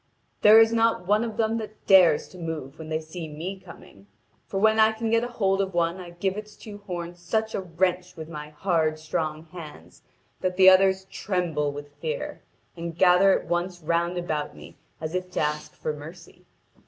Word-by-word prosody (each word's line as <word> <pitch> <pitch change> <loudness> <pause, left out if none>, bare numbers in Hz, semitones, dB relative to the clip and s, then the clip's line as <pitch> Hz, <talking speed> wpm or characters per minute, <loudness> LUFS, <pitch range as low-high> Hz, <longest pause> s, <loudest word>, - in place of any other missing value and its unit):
'There 215 +1 +9
is 225 0 +5
not 225 -4 +2
one 210 +4 +3
of 225 -2 -5
them 225 0 +1
that 215 -1 -9
dares 185 -6 +6
to 180 - -14
move 160 -3 -6
when 160 -1 -8
they 155 0 -1
see 160 +1 -7
me 170 +6 -6
coming. 100 - -15 0.4
For 195 - -4
when 220 +1 +4
I 220 0 +5
can 220 0 -3
get 230 0 +4
hold 200 -5 0
of 190 -2 -3
one 170 +1 +1
I 180 -1 -8
give 185 +3 -2
its 210 0 -8
two 205 -1 -10
horns 175 -1 -5
such 220 +5 -1
a - - -1
wrench 180 +1 -1
with 160 -1 -8
my 150 -2 -8
hard, 155 -1 0
strong 155 0 -3
hands 150 - -12 0.4
that 185 0 -2
the 190 0 +9
others 190 0 +4
tremble 175 -7 -2
with 145 0 -9
fear, 480 +1 -4 0.3
and 170 -1 -6
gather 185 +2 +5
at - - -12
once 175 0 -2
round 170 +2 0
about 155 -4 -3
me - - -13 0.2
as 160 +1 -5
if 185 0 -3
to - - -1
ask 150 0 -2
for 155 - -3
mercy. 150 +4 -12
180 Hz, 195 wpm, -25 LUFS, 160-195 Hz, 0.4 s, There